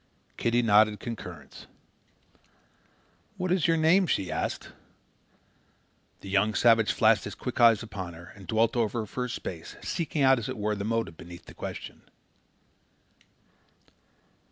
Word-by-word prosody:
Kitty 120 +1 +1
nodded 105 -1 +4
concurrence. 90 - -8 1.7
"What 185 -1 -2
is 180 -4 +2
your 165 0 +3
name?" 170 +4 +4
she 95 - -1
asked. - - -3 1.5
The - - -10
young 105 +2 +2
savage 115 -2 +4
flashed 110 -4 +3
his - - -6
quick 125 -1 -4
eyes 115 -2 +6
upon 95 -6 -7
her 85 +1 -12
and 100 -2 -13
dwelt 115 +2 +2
over 115 0 0
her - - -5
for 125 +4 -4
a - - -6
space, 85 -7 -6
seeking 155 -3 -1
out, 135 -1 +5
as 115 - -5
it - - -4
were, 105 0 -1
the 100 -1 -4
motive 115 -6 -2
beneath 85 0 -11
the - - -12
question. - - -7
110 Hz, 145 wpm, -28 LUFS, 100-120 Hz, 1.7 s, eyes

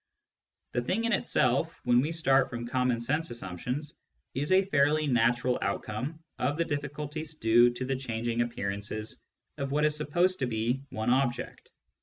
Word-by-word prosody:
The 120 - 0
thing 190 - -1
in 230 - +1
itself, 140 -3 +1
when 120 0 +4
we 150 +4 -1
start 135 -5 +3
from 120 -1 -5
common 125 -1 +1
sense 150 +7 0
assumptions, 125 - -5 0.4
is 145 +5 -2
a 190 +1 +5
fairly 150 -3 +3
natural 120 -1 +2
outcome 110 +10 -3 0.2
of 140 +4 0
the 170 - +1
difficulties 150 +2 -4
due 120 -3 +5
to 120 +1 -4
the 135 +1 -1
changing 120 -2 -2
appearances 105 -1 -3 0.4
of 140 -1 -2
what 150 +2 +2
is 150 0 +2
supposed 175 +5 +1
to 130 - 0
be 120 +3 -1
one 110 -1 -1
object. 130 -1 -1
130 Hz, 160 wpm, -29 LUFS, 120-150 Hz, 0.4 s, a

